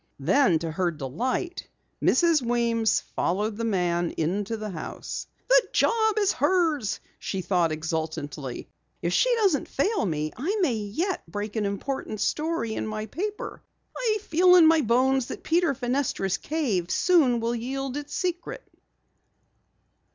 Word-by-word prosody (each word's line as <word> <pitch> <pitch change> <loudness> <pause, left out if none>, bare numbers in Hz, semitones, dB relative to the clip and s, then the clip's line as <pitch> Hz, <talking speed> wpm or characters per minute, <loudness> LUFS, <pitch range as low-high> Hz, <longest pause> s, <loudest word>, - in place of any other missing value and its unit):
Then, 195 - +3
to 160 0 -4
her 175 +2 0
delight, 170 - -3 0.3
Mrs. 335 -4 +4
Weems 235 -2 +1
followed 205 +5 0
the 230 - -4
man 175 -5 0
into 200 +7 -1
the 215 -1 -5
house. 165 - -6 0.2
"The - - +6
job 440 -2 +2
is 410 -2 +3
hers!" 320 - +1 0.2
she 190 - -3
thought 175 -3 +1
exultantly. 155 -4 -4 0.4
"If 170 +1 0
she - - +3
doesn't 390 - +2
fail 400 - 0
me, 155 -2 -2
I 355 - -1
may 295 -9 +2
yet 225 - -2
break 205 +2 -4
an 210 -2 0
important 215 +1 -4
story 305 -2 -1
in - - -3
my 215 0 -4
paper! 410 - -5 0.3
I 445 -3 +1
feel 360 +1 +5
in 345 -3 +8
my 320 0 +5
bones 255 +1 +2
that - - -7
Peter 335 -3 +2
Fenestra's 245 -7 -1
cave 230 - -1
soon 300 -10 +3
will 230 +1 -1
yield 265 +3 -3
its 290 0 -5
secret!" 360 +6 -3
235 Hz, 145 wpm, -26 LUFS, -, 0.4 s, in